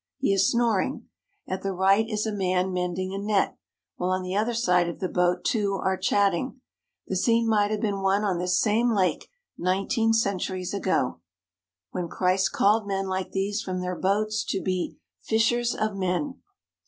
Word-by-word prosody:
He 275 -7 +1
is 195 0 +3
snoring. 235 -5 0 0.4
At 185 0 -3
the 195 0 -2
right 195 +4 +3
is 215 -1 -1
a 220 - -1
man 185 -1 0
mending 180 +1 -2
a 195 - -3
net, 205 -1 +1 0.4
while 180 - -1
on 185 0 0
the 185 +1 -3
other 220 +3 0
side 180 -6 +2
of 170 - -7
the 185 - -1
boat 180 0 +1
two 205 -6 +1
are 190 0 0
chatting. 200 +7 +1 0.5
The 190 - -3
scene 230 +4 +2
might 210 -2 +3
have 215 -1 -2
been 200 -3 -1
one 195 +2 +2
on 190 -4 0
this 180 +1 +1
same 225 +2 +2
lake 185 -2 0 0.3
nineteen 195 +5 +1
centuries 190 -4 -1
ago, 185 - 0 0.7
when 180 -2 -3
Christ 185 +2 +1
called 210 +1 +2
men 195 -1 -1
like 190 0 -2
these 200 +2 -1
from 185 -4 -3
their 180 0 -3
boats 215 +4 0
to 195 - -1
be 185 0 -2 0.2
"fishers 235 +2 +1
of 215 -1 -1
men." 195 +9 -2
195 Hz, 180 wpm, -26 LUFS, 185-215 Hz, 0.7 s, is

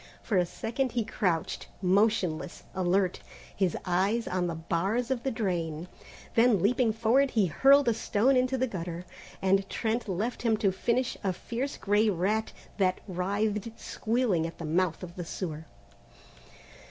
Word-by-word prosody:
For 215 - -1
a 180 -1 +3
second 250 +7 -2
he 235 -3 0
crouched, 180 -7 -1
motionless, 190 -3 +1
alert, 185 0 +1 0.4
his 190 -4 +1
eyes 195 +6 +1
on 180 -1 0
the 170 - -3
bars 195 +10 -1
of 255 -3 0
the 270 - -1
drain, 175 -8 -2 0.5
then 230 -3 +4
leaping 230 +4 +2
forward 230 +5 +3
he 220 -5 +2
hurled 275 - +5
a 235 - +4
stone 225 +4 +2
into 255 +1 +2
the 260 - +2
gutter, 175 -5 -5 0.4
and 195 +1 +2
Trent 225 -1 -1
left 210 +7 -2
him 225 -2 +2
to 205 -3 +2
finish 240 +6 0
a 195 - +1
fierce 245 +9 -4
grey 210 +2 +2
rat 205 +4 0 0.3
that 185 -1 +2
writhed 205 +4 -2
squealing 220 -8 0
at 165 - -10
the 170 - -6
mouth 170 +2 0
of 175 -1 -8
the 175 - -3
sewer. 160 -2 -5
200 Hz, 155 wpm, -29 LUFS, 180-230 Hz, 0.5 s, hurled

